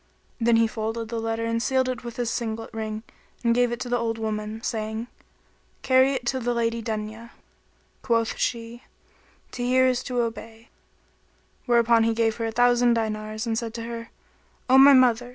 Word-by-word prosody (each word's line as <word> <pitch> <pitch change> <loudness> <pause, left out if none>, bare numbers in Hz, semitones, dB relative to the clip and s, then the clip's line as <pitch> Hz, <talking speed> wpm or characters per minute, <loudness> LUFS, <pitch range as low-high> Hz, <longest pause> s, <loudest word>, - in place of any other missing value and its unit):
Then 235 0 +3
he 225 0 +4
folded 225 0 -4
the 230 -1 -3
letter[FN#31] 225 0 -2
and 230 0 -1
sealed 260 +1 +1
it 255 -1 -4
with 235 -1 -7
his 240 -2 -2
signet 225 -2 -4
ring 220 -1 -4 0.4
and 235 -1 +3
gave 245 0 +2
it 240 - -4
to 255 - -4
the 245 0 0
old 225 -1 -2
woman, 215 0 -4
saying, 220 0 -3 0.8
"Carry 260 +1 +4
it 250 -2 -4
to 260 +2 0
the 245 0 -1
Lady 230 0 0
Dunya." 220 +1 -5 0.7
Quoth 230 -2 0
she, 235 0 -3 0.7
"To 245 - -6
hear 255 +1 +3
is 255 -1 +1
to 250 -2 0
obey;" 225 0 -6 1.0
whereupon 235 -1 +4
he 225 0 +1
gave 225 -1 +1
her 230 -1 -2
a - - -3
thousand 245 0 +3
dinars 215 0 -3
and 225 -1 -1
said 230 -1 -4
to 230 - -5
her, 230 0 -7 0.6
"O 260 +1 +6
my 280 +1 +9
mother! 245 -2 +4
230 Hz, 185 wpm, -25 LUFS, 225-245 Hz, 1.0 s, my